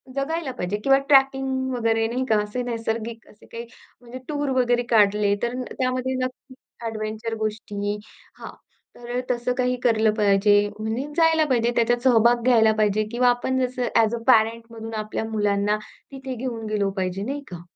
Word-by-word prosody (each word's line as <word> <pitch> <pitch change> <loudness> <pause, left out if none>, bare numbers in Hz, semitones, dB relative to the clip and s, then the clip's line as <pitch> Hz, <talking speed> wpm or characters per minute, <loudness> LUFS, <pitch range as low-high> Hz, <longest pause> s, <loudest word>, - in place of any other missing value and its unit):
जगायला 285 +1 -2
पाहिजे, 200 -3 -3
किंवा 270 0 +5
ट्रॅकिंग 270 -1 +3
वगैरे, 225 -2 +1
नाही 250 +3 -2
का. 220 - +4
असे 210 +4 -4
नैसर्गिक 230 -1 -4
असे - - -19
काही 235 +1 -8 0.4
म्हणजे 245 +1 -9
टूर 290 -2 -2
वगैरे 245 0 +1
काढले, 205 -2 +3
तर 245 +2 -2 0.2
त्यामध्ये 255 0 -1
नक्की 255 +1 -10 0.3
एडव्हेंचर 220 +1 -4
गोष्टी. 210 -1 -3 0.4
हां, - - -8 0.4
तर 240 +1 -5
तसं 245 0 -1
काही 250 0 +1
केलं 220 -2 +3
पाहिजे. 205 -1 +3 0.2
म्हणजे 220 +5 -2
जायला 325 -1 +4
पाहिजे, 240 -2 +2
त्याच्यात 240 +1 +2
सहभाग 240 -1 +4
घ्यायला 225 -3 +5
पाहिजे, 215 0 +2
किंवा 245 +1 +3
आपण 260 +2 0
जसं 250 -1 -3
ॲज 225 0 +3
अ, - - -5
पॅरेंटमधून 230 -1 +1
आपल्या 215 0 -3
मुलांना 205 -1 +1 0.3
तिथे 265 -1 -6
घेऊन 235 -2 -5
गेलो 205 -2 0
पाहिजे, 185 +1 -2
नाही 280 +6 -4
का. 175 -1 -7
235 Hz, 160 wpm, -23 LUFS, 215-255 Hz, 0.4 s, किंवा